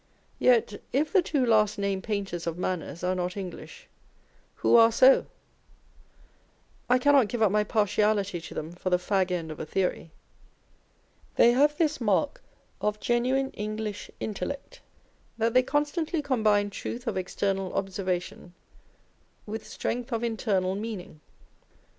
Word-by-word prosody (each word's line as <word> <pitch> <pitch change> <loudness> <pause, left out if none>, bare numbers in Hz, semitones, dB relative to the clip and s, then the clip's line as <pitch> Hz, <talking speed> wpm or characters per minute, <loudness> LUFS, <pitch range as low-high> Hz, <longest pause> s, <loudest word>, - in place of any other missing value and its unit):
Yet, 230 -4 +3
if 295 +7 0
the 385 - +6
two 285 -6 0
last 215 -3 +3
named 200 -1 -1
painters 195 -6 -3
of 170 0 -2
manners 180 -2 -4
are 180 +1 +1
not 180 +1 -3
English, 335 - -8 0.7
who - - +3
are 230 0 +7
so? 260 +4 +5 1.6
I 250 - +5
cannot 275 -2 +4
give 225 +1 -1
up 205 - +4
my 210 0 +3
partiality 210 -3 +1
to - - -10
them 155 +2 -5
for 180 +1 -4
the 180 - +3
fag 190 +1 0
end 170 -3 -3
of 155 - -8
a - - -4
theory. 180 -2 -1 1.3
They 235 - +6
have 290 +4 +3
this 310 -5 0
mark 230 +7 +1 0.4
of 210 0 -1
genuine 255 +4 +1
English 210 0 -5
intellect, 275 +7 -5 0.6
that 225 0 +1
they 255 - +6
constantly 295 +4 -1
combine 215 -6 +2
truth 240 +4 -6
of 230 - -2
external 190 0 -2
observation 185 -2 -3 0.9
with 215 0 -6
strength 245 +3 -4
of 230 0 -1
internal 205 -5 0
meaning. 200 -6 -6
210 Hz, 140 wpm, -27 LUFS, 190-245 Hz, 1.6 s, are